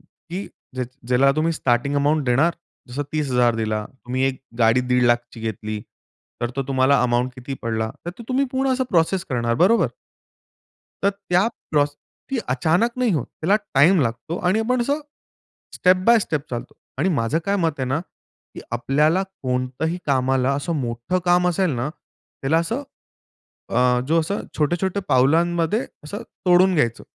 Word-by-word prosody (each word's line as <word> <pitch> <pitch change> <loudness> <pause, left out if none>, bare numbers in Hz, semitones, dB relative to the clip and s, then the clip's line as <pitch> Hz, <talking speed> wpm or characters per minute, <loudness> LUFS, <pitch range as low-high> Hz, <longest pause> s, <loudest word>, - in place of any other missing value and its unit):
की, 170 +4 -9 0.3
ज्याची 130 +1 -5
ज्याला 135 +2 +4
तुम्ही 165 +2 +2
स्टार्टिंग 135 -1 0
अमाउंट 145 +1 +2
देणार, 140 +8 +3 0.3
जसं 130 +4 -3
30,000 125 -6 +2
दिला, 110 -1 -1
तुम्ही 130 0 -4
एक 135 -1 -3 0.2
गाडी 115 +2 +4
दीड 125 0 +1
लाखाची 120 0 +1
घेतली, 110 -1 -4 0.6
तर 120 - 0
तो 135 - 0
तुम्हाला 130 0 +3
अमाउंट 125 +1 +1
किती 130 +2 -6
पडला, 110 -1 -1 0.2
तर - - -1
ते - - -7
तुम्ही 265 +2 +2
पूर्ण 265 0 +1
असं 260 0 0
प्रोसेस 175 +2 +2
करणार, 120 -2 0
बरोबर? 190 - +4 1.1
तर 200 - +4
त्या 195 0 +1 0.2
प्रोसेस, 145 -1 +1 0.3
ती 270 - 0
अचानक 160 - +2
नाही 250 -5 +2
होत. 145 -7 -1
त्याला 195 +6 +1 0.2
टाईम 165 +6 +6
लागतो 120 +7 -2
आणि 190 +5 +3
आपण 250 +2 +1
असं, 285 +5 0 0.7
स्टेप 185 0 +4
बाय 235 -1 +7
स्टेप 150 -7 -2
चालतो. 120 +1 -5 0.2
आणि 190 - +2
माझं 140 -2 +1
काय 200 0 +1
मत 165 -5 0
आहे - - +1
ना, 135 +4 0 0.5
की - - -7
आपल्याला 150 +9 +2 0.2
कोणतंही 130 +6 -1
कामाला 130 -1 +2
असं 145 +4 -2
मोठं 120 +9 -2
काम 180 0 +4
असेल 180 0 +1
ना, 120 +4 -2 0.5
त्याला 155 +4 +3
असं, 230 +12 -2 0.9
अ, 125 0 +3
जो 165 +1 +3
अ, 200 - 0 0.2
छोटे-छोटे 175 +6 0
पावलांमध्ये 165 - +2 0.2
असं 175 +8 -6 0.2
तोडून 180 +1 +5
घ्यायचं. 120 -6 +1
145 Hz, 160 wpm, -22 LUFS, 125-180 Hz, 1.1 s, बाय